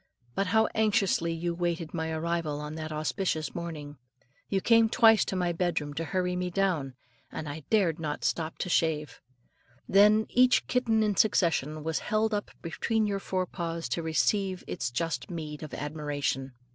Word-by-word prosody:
But 195 +6 0
how 220 +3 +3
anxiously 205 -6 +2
you 170 +1 -2
waited 170 -2 -2
my 160 -2 -2
arrival 160 -2 -2
on 150 0 -6
that 155 0 -5
auspicious 155 0 -1
morning. 155 -4 -6 0.5
You 195 - +1
came 230 +2 +4
twice 225 -2 +6
to - - -3
my 180 -2 +1
bedroom 170 -4 -1
to 165 +3 -3
hurry 180 +3 -1
me 180 0 -1
down, 170 -8 0 0.4
and 155 - -5
I 145 0 -7
dared 185 -7 +2
not 150 -2 -4
stop 160 -1 -1
to - - -6
shave. 160 -3 0 0.7
Then 210 +2 +5
each 250 0 +4
kitten 230 -3 +2
in 205 -3 0
succession 160 -7 +2
was 160 0 -1
held 215 +1 0
up 205 -1 -2
between 220 +6 0
your 200 -1 -1
forepaws 170 -3 -3
to 135 - -1
receive 185 +4 0
its 120 - -3
just 145 +2 -3
meed 155 -3 -6
of 155 - -7
admiration. 145 -3 -3
170 Hz, 165 wpm, -29 LUFS, 155-195 Hz, 0.7 s, twice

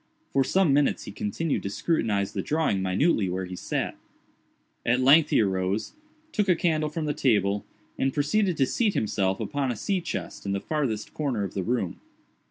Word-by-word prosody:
For 135 - +4
some 180 +1 +3
minutes 145 0 +2
he - - -7
continued 105 +10 -2
to 100 - -3
scrutinize 105 - 0
the - - -1
drawing 150 -11 0
minutely 95 - +2
where 95 +1 -2
he 90 0 -7
sat. - - -2 0.9
At 125 +2 +2
length 145 +4 +6
he - - +4
arose, 95 - -1 0.4
took 210 -3 0
a 180 - +6
candle 155 -2 +1
from 155 +1 -3
the 150 - 0
table, 105 -7 +1 0.4
and 135 - +2
proceeded 170 +6 +1
to 135 - +4
seat 210 - 0
himself 95 -3 0
upon 140 -3 -1
a - - -3
sea 185 - -1
chest - - -5
in 100 - -2
the 100 - 0
farthest 125 -6 -2
corner 135 -9 -1
of 100 - -4
the 95 - -2
room. 105 -3 -2
130 Hz, 185 wpm, -26 LUFS, 100-155 Hz, 0.9 s, length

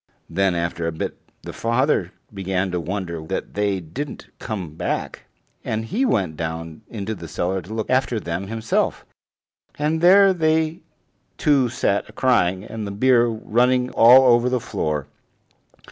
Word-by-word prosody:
Then 95 -2 +1
after 85 0 -2
a - - -1
bit 80 - -4 0.3
the - - -7
father 115 - +1 0.2
began 95 -1 -2
to 90 - -1
wonder 85 -2 -4
that - - -4
they 100 -2 0
didn't 125 - -7
come 95 -8 -5
back, 80 - -4 0.4
and 110 0 -2
he 240 - 0
went 95 - 0
down 80 +2 -5
into 110 -1 -4
the 85 -5 -8
cellar 95 +4 -2
to 90 - -13
look 110 -2 -2
after 130 -3 +1
them 90 +1 -4
himself, 110 +1 -1 0.7
and 155 +2 0
there 195 +2 +7
they 160 -1 +1 0.6
two 140 -5 +3
sat 100 -4 -1
crying, 95 -8 +2
and 110 -1 -6
the - - -5
beer 120 +3 +3
running 125 +3 +1
all 125 +2 +7
over 120 +1 +3
the 125 0 0
floor. 75 - -2
110 Hz, 150 wpm, -22 LUFS, 90-130 Hz, 0.7 s, there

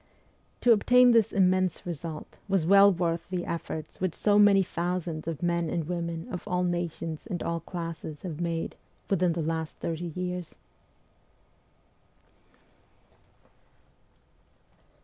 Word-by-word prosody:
To 245 - +5
obtain 245 +3 +6
this 230 -3 +4
immense 185 -2 +2
result 165 -2 -6
was 190 -5 +1
well 200 +2 +7
worth 170 -1 -1
the 180 -2 -2
efforts 160 -1 -5
which 185 -3 -1
so 205 -1 +3
many 200 -2 +6
thousands 170 -2 -3
of 165 0 -4
men 170 -1 +1
and 165 -2 -2
women 170 -1 -3
of 180 - -6
all 180 0 0
nations 170 -2 -3
and 175 - -3
all 170 0 -1
classes 165 -3 -6
have 170 -3 -5
made 165 -1 -2 0.4
within 180 -3 +2
the 165 -1 -2
last 160 0 -3
thirty 165 +1 -3
years. 180 -1 -4
175 Hz, 125 wpm, -28 LUFS, 165-185 Hz, 0.4 s, well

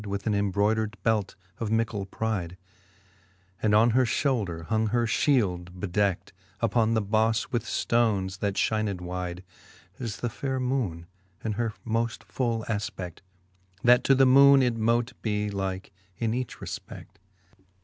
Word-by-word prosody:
With 100 0 -4
an 110 - +1
embrodered 105 +2 +1
belt 110 -3 +1 0.2
of 115 - -2
mickell 110 -3 -1
pride; 95 -5 -3 1.0
And 105 -1 +3
on 115 +2 +5
her 130 +3 +4
Ihoulder 105 - -1
hung 110 +6 +1
her 120 +2 +1
fhield, 90 -9 +1
bedeckt 100 -1 -1 0.3
Uppon 115 -1 +2
the 110 - +1
bofle 110 +2 +1
with 120 -2 -1
ftones, 100 -6 0
that 100 -2 -1
Ihined 110 -2 0
wide^ 90 0 -5 0.6
As 115 -4 -4
the 120 - -2
faire 130 +1 -3
moone 125 -11 -1 0.4
in 110 - -1
her 110 +1 -2
moft 115 0 -1
full 115 -4 -2
afpe6J:, 100 -5 -4 0.6
That 125 0 +6
to 135 - +5
the 135 0 +5
moone 140 +1 +7
it 120 -2 +1
mote 115 +3 +1
be 105 -1 -1
like 95 -1 -4 0.3
in 115 -1 -1
each 125 -1 -3
refpefl^ - - -7
IV. - - -15
110 Hz, 150 wpm, -27 LUFS, 100-120 Hz, 1.0 s, moone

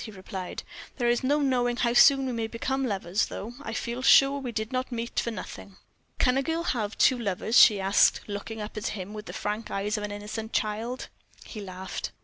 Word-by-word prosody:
he - - -7
replied; 190 -2 -7 0.3
"there 240 -3 0
is 240 +1 +1
no 290 +3 +2
knowing 245 -3 +1
how 240 -1 +1
soon 270 +2 +6
we 260 - -2
may 230 -2 -2
become 265 +4 -2
lovers, 195 -2 -1
though. 225 +4 -7
I 225 - -6
feel 235 +2 -3
sure 275 +1 +6
we 255 -3 -5
did 220 0 -3
not 255 +1 -2
meet 235 0 -2
for - - -1
nothing." 200 -3 -8 0.4
"Can 250 0 +3
a - - +3
girl 325 +4 -2
have 220 -9 -2
two 255 - +4
lovers?" 215 +1 +2
she 210 -3 +7
asked, 195 +1 +4
looking 210 +2 -6
up 210 - -7
at 215 - -2
him 200 0 -5
with 210 0 -8
the - - -7
frank 210 +2 -3
eyes 205 +2 -1
of 210 - -4
an 210 - -4
innocent 210 +2 -6
child. 225 +4 -2 0.4
He 215 - -8
laughed. 190 -1 -6
225 Hz, 215 wpm, -27 LUFS, 205-250 Hz, 0.4 s, she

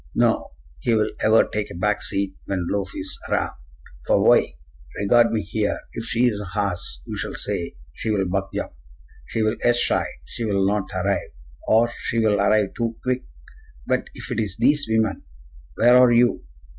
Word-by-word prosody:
No; - - +1 0.3
he 115 - +1
will 110 -1 +1
ever 110 +1 +6
take 105 -1 -3
a - - -9
back 105 +4 0
seat 100 -1 -2
when 95 -3 -1
lofe 100 -2 -2
is 95 - -4
around. - - 0 0.6
For - - +3
why? - - +5 0.5
Regard 115 +3 +4
me 110 -2 0
here! 105 +1 -1 0.2
If 115 - -5
she 120 +1 +2
is 105 -4 0
a - - -6
horse, 100 -3 -3
you - - -6
shall - - -4
say, 85 -5 -3 0.2
'She 110 - -4
will 100 -3 +1
buck 95 +2 -2
jump,' - - -4 0.5
'She 110 - -1
will 110 0 0
ess 120 0 +3
shy,' - - +2 0.2
'She 120 - -5
will 100 -2 +1
not 100 0 0
arrive,' 100 +2 -1 0.3
or 115 +2 +4
'She 115 - -3
will 105 -3 +3
arrive 105 -1 +2
too 115 -1 -2
quick.' 125 0 -1 0.6
But - - 0
if - - -7
it - - -1
is 105 -3 -2
thees 145 +3 +3
women, 110 -3 +1 0.5
where 120 +2 +5
are 125 -1 +7
you? 120 - +3
105 Hz, 185 wpm, -23 LUFS, 100-115 Hz, 0.6 s, are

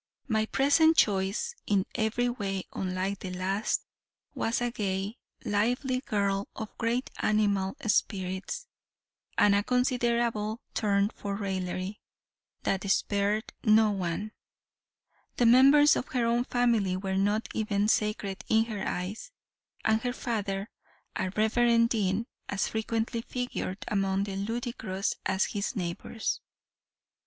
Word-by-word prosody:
My 220 -3 +1
present 315 +6 +4
choice, 200 - +2
in 200 -2 +2
every 220 +3 +1
way 195 -6 -2
unlike 190 +1 -2
the 190 - -5
last, 190 +4 -1 0.5
was 225 - 0
a 245 0 -1
gay, 200 0 -2 0.3
lively 245 +5 +1
girl, 200 -3 0
of 220 -1 -7
great 235 +3 0
animal 200 -3 +1
spirits, 200 - -1 0.7
and 205 - +5
a 200 - +4
considerable 235 -2 +1
turn 200 -2 +2
for 200 -1 -4
raillery, 190 0 -3 0.6
that 195 0 -1
spared 205 +2 +1
no 215 -1 +5
one; 195 +2 -2 1.1
the 240 - +3
members 275 +5 +7
of - - -2
her 245 -2 0
own 235 +1 +2
family 230 -8 +2
were 190 0 -2
not 205 +3 +1
even 210 -2 0
sacred 210 -3 0
in 220 0 +4
her 215 -4 -5
eyes; 185 - -4 0.6
and 220 0 +3
her 245 +1 -1
father, 205 -5 -3 0.4
a 190 -2 -1
reverend 230 +1 +3
dean, 205 -1 0 0.2
as 200 -1 0
frequently 225 +1 -1
figured 245 -6 -4
among 195 -1 +1
the 200 -1 -4
ludicrous 220 -1 -2
as 190 +1 +2
his 205 +5 -3
neighbors. 185 +4 -3
210 Hz, 125 wpm, -29 LUFS, 195-235 Hz, 1.1 s, members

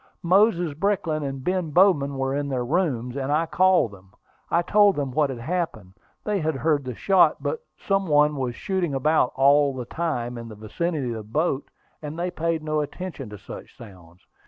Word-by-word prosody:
Moses 180 -3 +3
Brickland 165 -3 -1
and 135 -1 -5
Ben 180 -1 -1
Bowman 145 -5 +3
were 135 0 -1
in 145 0 -2
their 125 -2 -2
rooms, 130 -6 -1
and 140 0 -2
I 155 +3 +2
called 180 - +3
them. 95 -1 -16 0.4
I 170 - +2
told 205 +1 +4
them 140 -3 -2
what 145 +2 +1
had 130 - -5
happened. 120 - -3 0.3
They 210 -2 -1
had 160 -2 -1
heard 145 +2 +1
the 125 -2 -5
shot; 190 - +4
but 475 0 -3
some 195 -1 0
one 150 0 +4
was 130 -3 -3
shooting 180 -4 -2
about 145 -1 +2
all 140 +1 +4
the 125 -2 -5
time 125 -6 -3
in 115 - -8
the 110 - -10
vicinity 135 +6 -3
of 115 - -3
the 110 - -7
boat, 145 -1 -1 0.3
and 150 +1 -6
they 175 +1 -2
paid 165 -1 -2
no 155 -1 0
attention 150 -4 -6
to 105 - -9
such - - -11
sounds. 90 -5 -14
150 Hz, 195 wpm, -24 LUFS, 130-175 Hz, 0.4 s, told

